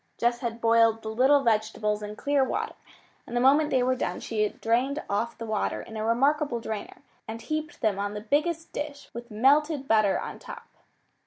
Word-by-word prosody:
Jess 240 0 +1
had 235 -1 -4
boiled 230 -1 +3
the 220 - -4
little 265 +5 +4
vegetables 215 -2 0
in 210 0 -6
clear 285 +3 +1
water, - - -2 0.5
and 240 - -3
the - - +3
moment 285 +4 +4
they 255 -3 +2
were 255 +1 +2
done - - -3
she 220 -2 -3
had 210 - -1
drained 255 +6 0
off 225 +4 -2
the 230 - -6
water 215 -2 -1
in 225 - -10
a 215 - -3
remarkable 270 +3 +1
drainer, 220 -2 -6 0.2
and 225 +1 -6
heaped 310 +4 -4
them 210 -4 +1
on 205 +1 -3
the 210 - -4
biggest 310 +8 -1
dish 290 -1 -6
with 235 +1 -8
melted 275 +5 +2
butter 215 -4 +3
on - - -7
top. - - -10
235 Hz, 195 wpm, -27 LUFS, 220-280 Hz, 0.5 s, little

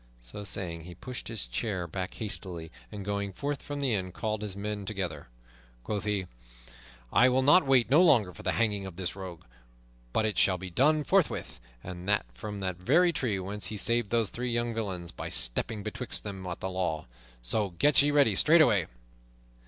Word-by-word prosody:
So - - -4
saying, 85 -4 +4
he 90 -1 -10
pushed 125 +8 -6
his 110 - -1
chair 90 - -2
back 90 +3 -5
hastily, 90 -6 -4 0.2
and 100 -2 -7
going 100 -1 -2
forth 140 +6 -3
from 145 -1 -5
the 135 -4 +1
inn 95 -3 -1
called 110 +2 -3
his 100 -2 -4
men 105 0 -4
together. 95 -2 -4 0.6
Quoth 105 - -3
he, 105 -3 0 0.9
"I 125 - +6
will 130 +1 +2 0.2
wait 130 -4 +3
no 150 +5 +7
longer 115 - +4
for - - -11
the - - -1
hanging 105 -4 0
of 90 - -9
this 90 0 -3
rogue, 95 -4 -8 0.7
but 110 - +1
it 110 - 0
shall 95 -1 +4
be 90 0 -7
done 150 - +3
forthwith, - - 0 0.2
and 90 +1 -7
that 105 - +2
from 105 - -7
the 95 -1 -1
very 155 - +3
tree 120 -9 -1
whence 100 +2 -4
he 105 - -4
saved 115 0 +2
those 115 -3 +1
three 125 +1 -3
young 120 0 0
villains 95 -6 -4
by - - -6
stepping - - -2
betwixt 110 +4 -3
them 95 -3 -6
and 90 - -5
the 95 - -3
law. 85 -4 -2 0.4
So 100 - 0
get 145 - +5
ye 145 - +3
ready 145 -7 +4
straightway." 150 - +4
105 Hz, 190 wpm, -29 LUFS, 90-120 Hz, 0.9 s, no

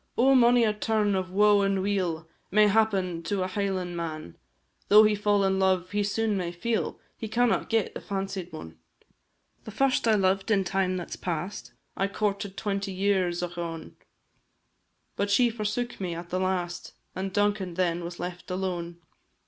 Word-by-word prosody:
Oh! 265 +3 +5
mony 245 -1 +5
a 215 -2 +2
turn 210 -1 0
of 185 -1 -1
woe 205 +2 +4
and 195 -1 +1
weal 180 -5 -1 0.2
May 210 +2 +5
happen 195 -5 +1
to 185 +3 -1
a - - -1
Highlan' 185 -2 -2
man; 155 - -5 0.5
Though 210 +1 +8
he 215 0 +4
fall 205 -1 +2
in 190 0 +1
love 185 -1 +1
he 205 0 0
soon 210 +1 0
may 180 -3 -2
feel 225 +6 -2 0.2
He 220 - -6
cannot 235 +2 +1
get 225 -3 +1
the - - -7
fancied 195 -2 -4
one; 80 - -10 0.8
The - - -9
first 255 +3 +1
I 220 - +5
loved 195 0 +1
in 200 -3 +3
time 185 0 0
that 175 - -6
's - - -3
past, 175 +2 -4 0.2
I 195 - 0
courted 200 -1 -2
twenty 200 -1 -2
years, 185 -2 0
ochone! 170 -2 -5 1.2
But 200 0 -1
she 235 +4 +4
forsook 220 +1 -3
me 175 -3 -3
at 175 +1 -8
the 185 - 0
last, 180 -2 -2 0.2
And 190 +1 -3
Duncan 205 -3 0
then 175 -1 0
was 175 0 -7
left 180 +1 -6
alone. 180 -2 -3
195 Hz, 175 wpm, -27 LUFS, 180-210 Hz, 1.2 s, Though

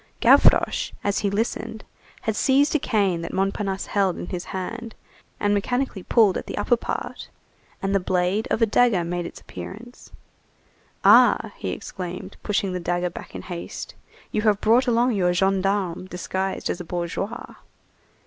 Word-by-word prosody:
Gavroche, - - +4
as 200 0 +1
he 200 - 0
listened, 220 +1 -2 0.4
had 220 - -1
seized 275 +5 +3
a 310 - +3
cane 195 -9 +1
that 170 - -5
Montparnasse 195 0 -1
held 195 -3 +1
in - - -5
his 180 -1 -5
hand, 225 +5 -5 0.4
and 205 0 +2
mechanically 245 +1 -1
pulled 210 0 +3
at - - -10
the - - -5
upper 240 - +3
part, 235 - -5 0.6
and 195 0 0
the 195 - +4
blade 185 +3 0
of 225 - +2
a - - +7
dagger 220 -4 +3
made 175 0 -3
its - - -11
appearance. 240 +5 -10 0.9
"Ah!" - - +6
he - - -4
exclaimed, 180 -1 -6
pushing 200 -2 -1
the 180 - -2
dagger 175 0 -1
back - - -10
in - - -6
haste, 175 -2 -7 0.4
"you 215 - 0
have 210 -2 +3
brought 235 +5 +3
along 240 +1 +3
your 180 -5 +2
gendarme 190 -1 0
disguised 190 +1 -3
as 175 - -4
a - - -5
bourgeois." 175 +6 -4
195 Hz, 160 wpm, -24 LUFS, 180-220 Hz, 0.9 s, a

